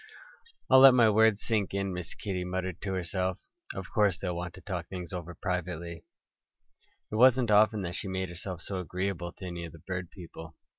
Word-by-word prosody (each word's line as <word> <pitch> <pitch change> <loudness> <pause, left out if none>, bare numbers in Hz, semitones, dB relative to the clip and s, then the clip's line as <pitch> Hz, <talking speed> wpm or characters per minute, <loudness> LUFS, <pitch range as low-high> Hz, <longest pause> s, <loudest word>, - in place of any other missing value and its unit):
"I'll 130 - +7
let 135 -1 +9
my 115 -3 +6
words 110 0 +4
sink 105 -4 0
in," 100 -1 -1
Miss 90 -1 -6
Kitty 95 -3 -3
muttered 90 -1 -3
to 95 -2 -3
herself. 95 +1 -1 0.4
"Of 95 -1 -6
course 100 -4 +3
they'll 90 -2 -3
want 90 0 -5
to 95 - -12
talk 90 -2 -4
things 90 -2 -7
over 85 -1 -6
privately." 85 -2 -4 1.1
It - - -3
wasn't 125 -1 +5
often 105 0 +4
that 85 -1 -4
she 100 - -4
made 95 -1 -2
herself 85 0 -7
so 95 -2 -4
agreeable 90 0 -3
to 95 - -10
any 85 -1 -5
of 85 - -8
the - - -11
bird 90 -2 -4
people. 80 -3 -11
95 Hz, 195 wpm, -29 LUFS, 85-100 Hz, 1.1 s, let